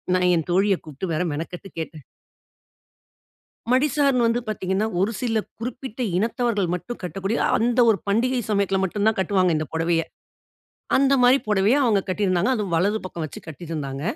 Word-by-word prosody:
நான் 180 0 +3
என் 165 - -1
தோழிய 195 +2 +3
கூப்டு 155 +4 -6
வேற 155 - 0
மெனக்கட்டு 170 +5 -6
கேட்டேன். 155 -3 -7 1.7
மடிசார்ன்னு 275 -2 +3
வந்து 230 +1 +1
பார்த்தீங்கன்னா, 195 0 -1
ஒரு 205 +5 +1
சில 230 -3 0 0.2
குறிப்பிட்ட 250 +1 -6 0.2
இனத்தவர்கள் 230 -1 0
மட்டும் 240 +7 -6
கட்டக்கூடிய, 195 +5 -2 0.2
அந்த 240 +2 +1
ஒரு 215 -4 +4
பண்டிகை 245 +5 +1
சமயத்துல 200 -2 +1
மட்டும் 205 +3 -1
தான் 220 - 0
கட்டுவாங்க, 185 -1 +2
இந்த 155 - -2
புடவைய. 165 0 +1 0.9
அந்த 275 +1 +3
மாரி 250 +2 +6
புடவைய 210 +5 +3
அவுங்க 220 -6 +3
கட்டிருந்தாங்க. 185 +2 +1
அதுவும் 200 -7 -2
வலது 205 +6 +2
பக்கம் 170 -2 -6
வைச்சு 150 - -8
கட்டிருந்தாங்க. 145 -3 -5
200 Hz, 150 wpm, -23 LUFS, 180-235 Hz, 1.7 s, மாரி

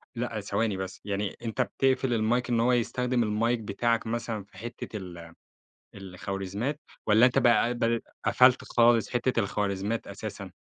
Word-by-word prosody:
لأ، 115 -2 -3
ثواني 100 0 -1
بس، 95 0 -6
يعني 100 -1 -3
أنت 115 +3 -1
بتقفِل 130 0 +1
المايك 120 +2 +1
إن 120 -1 +2
هو 120 +2 +3
يستخدِم 125 +1 +1
المايك 115 +3 +1
بتاعك 115 +2 -1
مثلًا 115 -2 -3
في 95 -1 -20
حِتّة 115 +1 -7 1.0
ال 95 -2 -10
الخوارزميّات 100 +9 -3 0.3
والّا 110 +3 +6
أنت 125 +1 +2
بقى 120 -2 +4
قبْل 115 -1 0 0.2
قفَلت 125 0 +5
خالص، 120 -1 +3
حِتّة 120 -2 +1
الخوارزميّات 100 +2 -2
أساسًا. - - -7
115 Hz, 145 wpm, -28 LUFS, 105-120 Hz, 1.0 s, والّا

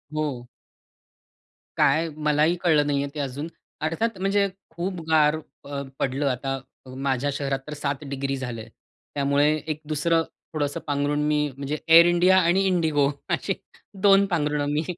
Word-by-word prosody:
हो. 140 -6 -3 1.3
काय 165 +1 +3 0.2
मलाही 150 +3 +3
कळलं 150 -4 +3
नाही 140 -1 +1
आहे 140 - -4
ते - - -4
अजून. 140 +2 -3 0.4
अर्थात 195 +7 -1
म्हणजे 200 +1 +2 0.2
खूप 175 +2 -4
गार 150 -1 +4 0.3
अ, 140 0 -4 0.2
पडलं 135 +2 -1
आता 135 +1 -2 0.4
माझ्या 135 +1 -1
शहरात 140 -1 -2
तर 150 - -5
7 145 0 -3
डिग्री 135 0 -2
झालं 125 -3 -5
आहे. - - -12 0.5
त्यामुळे 145 +2 +3
एक 155 0 -3
दुसरं 165 +2 +1 0.3
थोडंसं 145 -2 -1
पांघरुण 145 +1 0
मी 150 0 +2 0.2
म्हणजे 140 +2 -3 0.2
Air 170 +1 +10
India 180 +2 +4
आणि 175 +2 +3
Indigo 155 -6 +2 0.3
अशी - - -2 0.5
2 200 0 +6
पांघरुणं 150 -5 0
मी 155 - 0
150 Hz, 150 wpm, -24 LUFS, 140-165 Hz, 1.3 s, Air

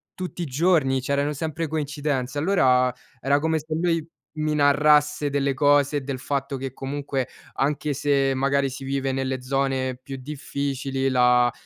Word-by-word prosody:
tutti 180 -1 -5
i - - -3
giorni, 140 -2 +2
c'erano 140 +2 0
sempre 160 +2 -3
coincidenze. 145 -3 -2
Allora, 130 -8 +3 0.3
era 140 +2 +2
come 160 +1 0
se 155 +1 -6
lui 165 -1 0 0.3
mi 155 0 -1
narrasse 150 0 +4
delle 140 -1 0
cose 145 0 +3
e - - -2
del 135 -1 -4
fatto 140 0 -2
che, 130 -1 -5
comunque, 135 -1 -3 0.3
anche 145 +1 -1
se, 140 -1 +1
magari, 140 +1 +1
si 135 +1 -8
vive 135 0 -1
nelle 130 -1 -2
zone 135 -1 0
più 135 +1 -8
difficili, 135 -1 -3
la 125 -1 +4
140 Hz, 155 wpm, -24 LUFS, 135-150 Hz, 0.3 s, narrasse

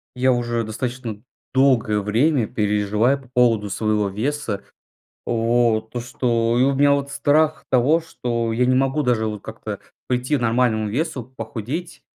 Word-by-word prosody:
Я 130 +1 +3
уже 120 -1 -1
достаточно 115 0 -5 0.3
долгое 125 -6 +3
время 115 +4 +2
переживаю 105 +6 +1
по 130 - -19
поводу 115 -5 +3
своего 105 -1 0
веса. 110 0 -3 0.6
Вот, 115 -1 +1
то, 120 - -3
что 115 -1 0
И - - +5
у 140 +1 +3
меня 145 +1 +4
вот 140 0 0
страх 150 +2 +2
того, 135 +6 +3
что 120 -8 -3
я 125 +2 +2
не 130 +1 +3
могу 135 +3 +1
даже 120 -5 +1
вот 105 -2 -5
как-то - - -7 0.3
прийти 125 +4 0
к - - -6
нормальному 115 -2 +1
весу, 130 +2 -2
похудеть. 130 - -5
120 Hz, 155 wpm, -22 LUFS, 110-135 Hz, 0.6 s, И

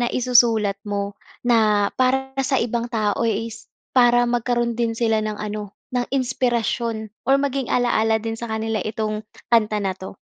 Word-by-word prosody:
na 240 - +1
isusulat 230 -5 +3
mo 200 0 -2 0.3
na 215 -4 +3
para 265 +1 +2
sa 270 0 +1
ibang 235 0 -1
tao 215 -2 0
is 225 +1 -3 0.3
para 240 -1 +5
magkaroon 240 0 0
din 230 -1 0
sila 225 -2 +2
ng 215 -1 -3
ano, 210 -1 -5 0.2
ng 245 -1 +1
inspirasyon 240 -3 -1 0.2
or 270 - +6
maging 275 -2 -1
ala-ala 225 -2 +2
din 225 0 -4
sa 235 - -4
kanila 220 0 -2
itong 215 -1 -2 0.3
kanta 215 -2 +3
na 190 - 0
'to? 190 +1 -9
230 Hz, 155 wpm, -22 LUFS, 215-245 Hz, 0.3 s, or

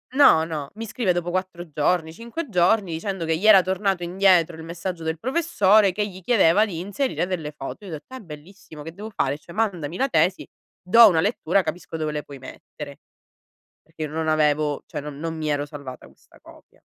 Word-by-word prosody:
no, 270 - +6
no, 155 -4 -5
mi 225 +1 -6
scrive 215 -4 0
dopo 175 0 -2
4 180 -2 -4
giorni, 160 +2 0
5 235 - -6
giorni, 185 0 +2
dicendo 180 +2 -4
che 160 0 0
gli 205 +6 0
era 205 -3 +9
tornato 190 0 -1
indietro 175 -2 +3
il 160 - -9
messaggio 170 +1 -5
del 160 0 -2
professore 220 - +3
che 210 +2 -1
gli 190 -2 -11
chiedeva 205 -1 +4
di 180 -7 -6
inserire 205 +3 -2
delle 170 -5 -4
foto. 150 +8 -8
Io 190 - -8
ho - - -5
detto: 155 - -10
“È - - -7
bellissimo, 160 -2 -12
che 165 - -7
devo 210 +5 -8
fare? 140 -7 -1
Cioè, 170 +3 -14
mandami 180 -8 -1
la 270 +1 +1
tesi, 175 0 +1 0.4
do 230 +5 +7
una 165 -5 +3
lettura, 195 -2 +1
capisco 165 +1 -6
dove 155 -1 -2
le 150 0 -4
puoi 140 - -11
mettere”. 140 +2 -10 0.8
Perché 160 0 -8
io 155 - -4
non 160 +1 -3
avevo 150 -1 +1
cioè - - -5
non 145 -1 -8
non 165 +1 -4
mi 155 -1 -3
ero 145 -1 0
salvata 140 -3 -9
questa - - -23
copia. - - -19
175 Hz, 205 wpm, -23 LUFS, 155-200 Hz, 0.8 s, era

